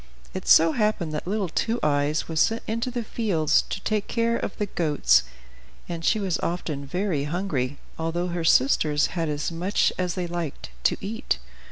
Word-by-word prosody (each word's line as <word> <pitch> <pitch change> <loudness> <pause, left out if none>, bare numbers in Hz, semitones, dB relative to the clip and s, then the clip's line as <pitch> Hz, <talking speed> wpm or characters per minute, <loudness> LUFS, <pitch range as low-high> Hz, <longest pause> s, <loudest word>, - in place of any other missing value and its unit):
It - - -5
so 165 0 +7
happened 210 -6 0
that 150 - -4
little 200 0 0
Two 225 +8 -1
Eyes 145 +1 +1
was 160 -1 -1
sent 225 +6 +2
into 230 +3 -2
the 245 -1 -3
fields 195 -9 +2
to - - -3
take 215 -2 0
care 230 0 +1
of 200 - -4
the 210 - 0
goats, 145 - +3 0.7
and 170 -1 -5
she 220 - +3
was 190 -4 -1
often 155 -5 -3
very 180 -3 -1
hungry, 145 -6 -2 0.2
although 170 +2 -1
her 170 -1 -2
sisters 150 0 +4
had 165 -2 -1
as 150 +2 -2
much 175 +4 +1
as 180 -2 -1
they 180 - -2
liked 170 -4 -5
to - - +3
eat. 215 - -2
175 Hz, 180 wpm, -25 LUFS, 150-205 Hz, 0.7 s, so